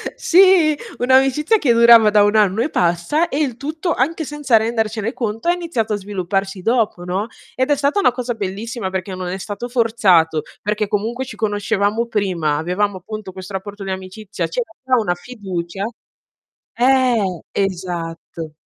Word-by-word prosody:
sì, 360 -4 +5 0.2
un'amicizia 270 - +3
che 260 -9 +3
durava 230 -2 +7
da 210 0 +5
1 205 +1 +2
anno 210 0 +3
e 310 - -3
passa 175 - +1
e 275 - -3
il 260 -6 -1
tutto, 315 +5 -2
anche 320 +5 -1
senza 290 -5 +2
rendercene 220 0 -1
conto 225 +6 -2
è - - +5
iniziato 320 -12 -2
a - - 0
svilupparsi 195 -1 -3
dopo, 225 -6 +1
no, 185 +4 -2 0.3
ed 260 +2 0
è 290 - +4
stata 285 +6 +1
una 390 - +4
cosa 245 0 -3
bellissima 215 +1 -4
perché 190 0 -4
non 185 -1 -5
è 180 +2 -3
stato 205 +4 -6
forzato, 210 -10 +3 0.2
perché 210 0 -1
comunque 225 +6 -2
ci - - -9
conoscevamo 210 +1 0
prima, 180 -9 0
avevamo 185 +5 -1
appunto 210 +1 -8
questo 190 +1 -9
rapporto 200 +1 -6
di 195 - -4
amicizia, 190 +2 -5
c'era - - -4
già 260 -1 +2
una 210 -5 0
fiducia 190 -3 -6 0.9
eh, 240 -8 +2
esatto. 170 -4 -4
215 Hz, 160 wpm, -19 LUFS, 190-250 Hz, 0.9 s, durava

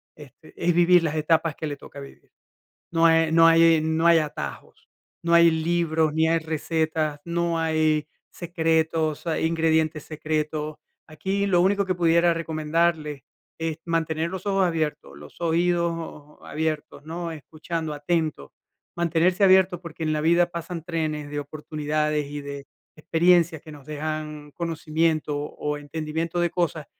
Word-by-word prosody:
este, 150 +1 -15
es 175 0 +1
vivir 175 0 +5
las 160 -1 -1
etapas 160 0 +1
que 155 - -5
le 145 - -4
toca 140 - -12
vivir. 140 - -13 0.6
No 165 0 +4
e 165 -1 +3
no 165 0 +6
hay 165 -1 +6
no 160 +1 0
hay 170 -1 +7
atajos. 150 -2 -6 0.3
No 170 0 -1
hay 170 0 +7
libros, 160 -1 +1
ni 160 +1 +2
hay 165 0 +3
recetas, 160 -1 -2
no 170 -1 -1
hay 155 -2 +1 0.2
secretos, 160 -2 -1
hay 160 -1 -1
ingredientes 160 -2 +1
secretos. 155 0 -3 0.3
Aquí 195 +6 -2
lo 180 -3 +3
único 200 +1 +2
que 185 - 0
pudiera 170 0 +3
recomendarle, 155 -3 -1 0.3
es 165 -1 -3
mantener 165 -1 -1
los 190 0 -6
ojos 195 -2 +2
abiertos, 155 - -3
los 75 - -14
oídos 170 -3 -1
abiertos, 155 -2 -4
¿no? 165 +1 -5
Escuchando 160 +1 -5
atento, 155 - -2 0.4
mantenerse 170 +3 +2
abierto, 185 -2 +4
porque, 170 -2 -9
en 155 -1 0
la 150 - 0
vida 170 +2 +3
pasan 170 -1 -6
trenes 155 -4 -3
de 145 0 -3
oportunidades, 150 0 -2
y 145 0 -5
de 140 -1 -7 0.3
experiencias, 165 0 +2
que 155 - -11
nos 145 -1 -13
dejan 150 0 -5
conocimiento, 160 -2 -1
o 150 0 -4
entendimiento 160 +3 -4
de 175 -1 +1
cosas, 165 -4 -2
160 Hz, 145 wpm, -24 LUFS, 155-170 Hz, 0.6 s, hay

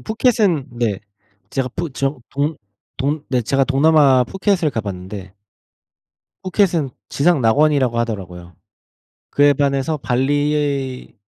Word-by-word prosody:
음 - - -16
푸켓은 215 - +1
네. 105 -5 -1 0.5
제가 135 -1 -1
푸 170 -2 -3
저 135 +1 -2
동 145 +2 -1 0.4
동 145 +3 -2
네. 125 -2 +1
제가 135 +4 +1
동남아 140 -2 +4
푸켓을 190 - 0
가봤는데 100 -4 -6 1.1
푸켓은 180 -6 +1 0.2
지상낙원이라고 140 -4 +2
하더라고요. 90 -7 -5 0.8
그에 145 0 +4
반해서 140 +2 0
발리의 140 0 -1
140 Hz, 250 characters per minute, -19 LUFS, 125-155 Hz, 1.1 s, 동남아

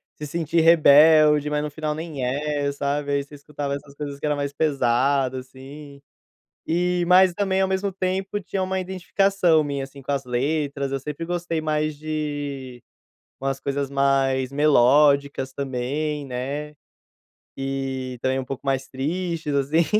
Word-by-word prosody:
se 150 - -7
sentir 165 +1 0
rebelde, 155 -2 +6
mas 150 0 -1
no 150 - -3
final 155 0 -3
nem 155 -4 -5
é, 145 +2 -1
sabe, 145 +1 -2
aí 140 0 +1
você 145 +1 -14
escutava 145 -1 -4
essas 140 0 -10
coisas 145 -1 -6
que - - -4
era 150 0 +1
mais 140 -1 -2
pesada, 135 -2 +1
assim. 140 +2 -12 0.7
E, 175 +1 +1
mas 185 0 +6
também, 190 0 0
ao 190 - +2
mesmo 190 +1 -1
tempo, 190 +2 -2
tinha 190 +1 -3
uma 190 0 -1
identificação 185 -2 +1
minha, 140 -2 -3
assim, 140 0 -13
com 135 - -4
as 140 -2 -1
letras, 140 +2 -1
eu 135 - -1
sempre 150 +4 -6
gostei 175 -1 -2
mais 155 -1 -1
de 145 -5 -5 0.6
umas 135 0 -2
coisas 140 0 -2
mais 135 -1 +1
melódicas 140 -1 +3
também, 140 +3 -3
né, 140 +4 -4 0.8
e 135 -1 -3
também 130 0 0
um 130 - -5
pouco 135 +2 -7
mais 135 -1 -1
tristes 160 +3 -3
assim, 145 +4 +2
145 Hz, 155 wpm, -23 LUFS, 135-160 Hz, 0.8 s, rebelde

